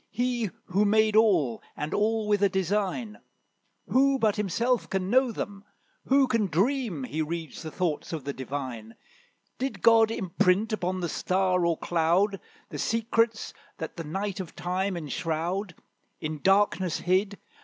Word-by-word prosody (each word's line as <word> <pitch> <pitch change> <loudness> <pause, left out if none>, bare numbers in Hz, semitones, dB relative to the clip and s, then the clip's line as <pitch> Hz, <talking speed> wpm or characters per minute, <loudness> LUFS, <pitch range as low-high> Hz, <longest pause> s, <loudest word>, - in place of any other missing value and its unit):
He 240 -1 -1 0.2
who 195 +3 +1
made 215 +1 +3
all, 175 - +3 0.2
and 150 - -3
all 220 +1 +1
with 205 -1 +2
a 200 - +4
design; 205 +3 -1 0.7
Who 275 +1 +3
but 220 -5 +2
himself 230 +5 0
can 190 0 -2
know 260 0 +4
them? 200 -2 -6 0.4
who 270 +1 +4
can 230 -5 +1
dream 195 - 0
He 140 +6 -3
reads 160 0 -4
the 160 - -6
thoughts 165 -2 -2
of 160 -4 -4
the 140 +1 -4
Divine, 130 -4 -6 0.6
Did 265 +2 -3
God 225 -1 +6
imprint 195 0 +1
upon 185 -2 -2
the 175 - -1
star 185 +2 +1
or 165 -2 +1
cloud 175 +4 +1 0.3
The - - -6
secrets 230 0 0 0.2
that 160 - -6
the 165 - -5
night 195 +5 -3
of 185 -3 -7
Time 185 +1 -2
enshroud, 170 +4 -3 0.4
In 155 -1 -4
darkness 195 -3 +2
hid? 195 +3 +1
195 Hz, 150 wpm, -27 LUFS, 170-220 Hz, 0.7 s, God